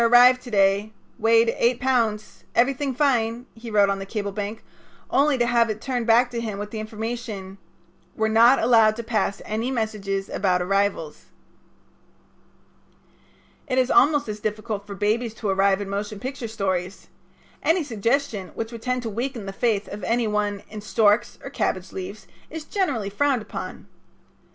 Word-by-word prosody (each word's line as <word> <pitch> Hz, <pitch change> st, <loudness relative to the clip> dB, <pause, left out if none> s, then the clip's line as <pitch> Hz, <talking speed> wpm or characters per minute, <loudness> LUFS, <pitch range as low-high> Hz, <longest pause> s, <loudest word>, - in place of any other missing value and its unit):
arrived 245 Hz, +2 st, +7 dB
to 250 Hz, -, -10 dB
day. 200 Hz, 0 st, +2 dB, 0.3 s
Weight 230 Hz, 0 st, +4 dB
eight 240 Hz, +1 st, +2 dB
pounds. 230 Hz, -5 st, 0 dB
Everything 270 Hz, +3 st, +2 dB
fine," 240 Hz, -4 st, +1 dB
he 230 Hz, +1 st, -9 dB
wrote 205 Hz, -2 st, +4 dB
on 195 Hz, 0 st, -1 dB
the 195 Hz, -, -5 dB
cable 205 Hz, -1 st, -3 dB
blank, 210 Hz, +2 st, -5 dB, 0.5 s
only 280 Hz, 0 st, +3 dB
to 240 Hz, -, +2 dB
have 235 Hz, -1 st, +3 dB
it 215 Hz, 0 st, -3 dB
turned 245 Hz, -1 st, -2 dB
back 240 Hz, +2 st, +4 dB
to 235 Hz, -1 st, -3 dB
him 215 Hz, -3 st, -4 dB
with 205 Hz, +1 st, -6 dB
the 220 Hz, -, -5 dB
information: 215 Hz, -3 st, -5 dB, 0.6 s
"We're 220 Hz, -, +1 dB
not 230 Hz, +4 st, +6 dB
allowed 225 Hz, -2 st, +4 dB
to 235 Hz, -, -5 dB
pass 215 Hz, -3 st, -1 dB
any 220 Hz, +4 st, -2 dB
messages 210 Hz, -5 st, -2 dB
about 185 Hz, -2 st, +1 dB
arrivals." 195 Hz, -4 st, -1 dB, 2.4 s
It 255 Hz, -, -1 dB
is 255 Hz, -1 st, +2 dB
almost 290 Hz, 0 st, +4 dB
as 210 Hz, 0 st, -5 dB
difficult 210 Hz, -1 st, -4 dB
for 200 Hz, -, -6 dB
babies 220 Hz, +3 st, 0 dB
to 215 Hz, -2 st, -3 dB
arrive 195 Hz, +1 st, +2 dB
in 200 Hz, -, -4 dB
motion 200 Hz, +1 st, -4 dB
picture 260 Hz, 0 st, -5 dB
stories. 190 Hz, -3 st, -3 dB, 0.6 s
Any 330 Hz, +1 st, +2 dB
suggestion 230 Hz, -4 st, -1 dB
which 225 Hz, 0 st, -4 dB
would 230 Hz, -2 st, -8 dB
tend 250 Hz, 0 st, -1 dB
to 230 Hz, -, -3 dB
weaken 235 Hz, 0 st, -4 dB
the 195 Hz, -, -6 dB
faith 215 Hz, -1 st, 0 dB
of 205 Hz, -1 st, -8 dB
any 230 Hz, +4 st, +1 dB
one 210 Hz, -1 st, -1 dB
in 215 Hz, -1 st, -7 dB
storks 210 Hz, +1 st, +2 dB
or 275 Hz, -, -7 dB
cabbage 185 Hz, -8 st, -2 dB
leaves 190 Hz, +3 st, -7 dB, 0.2 s
is 315 Hz, -1 st, -7 dB
generally 265 Hz, -, -1 dB
frowned 265 Hz, +1 st, +1 dB
upon. -, -, -7 dB
220 Hz, 165 wpm, -24 LUFS, 205-245 Hz, 2.4 s, arrived